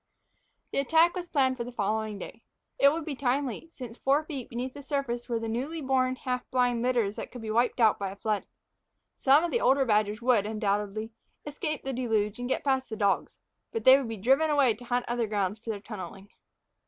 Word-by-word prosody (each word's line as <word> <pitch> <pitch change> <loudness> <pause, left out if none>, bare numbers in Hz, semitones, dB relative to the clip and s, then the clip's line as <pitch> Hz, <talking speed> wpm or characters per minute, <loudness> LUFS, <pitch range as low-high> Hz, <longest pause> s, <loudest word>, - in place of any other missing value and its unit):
The - - 0
attack 325 +5 +4
was 355 -1 -4
planned 260 -5 +1
for 235 - -2
the 245 - -7
following 215 -1 -2
day. - - -9 0.4
It 280 - +7
would 320 0 -3
be 305 - -3
timely, 265 +3 -1
since 245 -3 -9
four 280 +3 +2
feet 280 -6 -6
beneath 250 +2 -4
the 285 - -9
surface 265 -4 -3
were 235 -1 0
the 225 - -4
newly 265 +9 -3
born, 260 -2 +1
half 250 -1 -4
blind 245 -2 +1
litters 235 -5 +1
that - - -6
could 245 -2 -9
be 215 - -3
wiped 240 +3 +1
out 220 -3 +4
by 200 -1 -2
a 195 - -8
flood. 210 0 -2 0.7
Some 280 +4 +4
of 345 - -1
the 475 - +1
old 270 - +4
badgers 210 -2 +1
would, 235 -4 +2
undoubtedly, 210 0 -2 0.3
escape 305 +1 -4
the 270 - -3
deluge 225 -3 0
and 245 +1 -4
get - - -1
past 265 -2 0
the 220 - -4
dogs, 200 -2 0 0.3
but 455 - -3
they 260 - +9
would 270 -4 -1
be 225 - -4
driven 270 +10 +3
away 280 -6 +4
to 245 +3 -13
hunt 245 0 0
other 240 -1 -1
ground 205 0 -1
for 230 - -9
their 210 -2 -2
tunneling. 195 -2 -9
245 Hz, 215 wpm, -28 LUFS, 220-270 Hz, 0.7 s, they